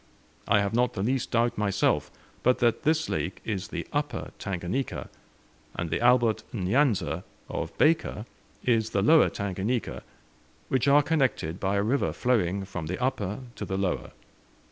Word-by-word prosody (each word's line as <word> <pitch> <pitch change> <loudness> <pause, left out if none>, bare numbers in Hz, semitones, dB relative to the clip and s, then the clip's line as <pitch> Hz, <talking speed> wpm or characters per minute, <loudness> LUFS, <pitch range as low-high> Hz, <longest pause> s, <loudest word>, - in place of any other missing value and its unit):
I 100 0 +4
have 100 +1 -1
not 125 +1 +2
the 95 - -2
least 130 +3 0
doubt, 120 -2 +1
myself, 100 -2 +1 0.3
but 125 +1 +3
that 120 -2 +2
this 160 +1 +2
lake 95 +2 -2
is 100 -5 -2
the - - -5
Upper - - -2
Tanganika, 95 +8 -3 0.7
and 85 -2 -3
the - - 0
Albert 120 -2 +4
N'Yanza 95 - +1 0.3
of - - -4
Baker 155 -8 +2 0.4
is 115 -3 +2
the 100 -3 0
Lower 160 +7 +6
Tanganika, 100 +4 -2 0.7
which 130 0 +1
are 145 +1 +6
connected 130 - 0
by 95 +1 0
a 100 - +2
river 130 +7 +1
flowing 100 -6 +1
from 90 -5 -5
the 90 - -3
upper 125 -4 -1
to - - -6
the 95 - -2
lower. 95 -2 -1
110 Hz, 155 wpm, -27 LUFS, 95-125 Hz, 0.7 s, Lower